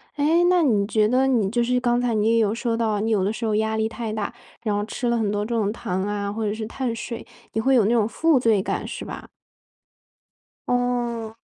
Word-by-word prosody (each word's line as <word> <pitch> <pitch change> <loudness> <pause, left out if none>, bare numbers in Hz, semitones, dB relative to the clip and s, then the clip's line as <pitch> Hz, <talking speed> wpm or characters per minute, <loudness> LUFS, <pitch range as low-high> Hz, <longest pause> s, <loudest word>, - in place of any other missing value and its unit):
诶， 315 +4 +3
那 360 -1 +4
你 215 -8 +2
觉 215 -1 +2
得 255 +4 +3
你 225 -7 +2
就 240 +2 +1
是 250 +1 +1
刚 245 -1 +1
才 245 -1 0
你 215 0 +1
也 - - +3
有 215 -1 +2
说 235 0 -1
到 215 -3 0
你 220 +2 -1
有 200 -3 +2
的 200 - +1
时 230 - -4
候 215 -1 +1
压 220 0 0
力 220 0 0
太 225 -2 -5
大， 215 -1 -3 0.3
然 210 -3 0
后 205 - 0
吃 240 +2 -3
了 235 - +2
很 210 -2 0
多 205 0 -1
这 235 +1 -2
种 210 -2 +1
糖 190 -4 -3
啊， 200 0 -2
或 220 +1 -3
者 205 - 0
是 220 0 -4
碳 240 -1 -3
水， 230 0 -6 0.3
你 220 - 0
会 265 +3 +3
有 230 -5 +4
那 215 - +2
种 225 -3 +3
负 310 +4 +2
罪 220 -5 +3
感， - - -3
是 - - -6
吧？ - - -8 1.4
哦。 240 -2 -1
225 Hz, 260 characters per minute, -23 LUFS, 210-245 Hz, 1.4 s, 那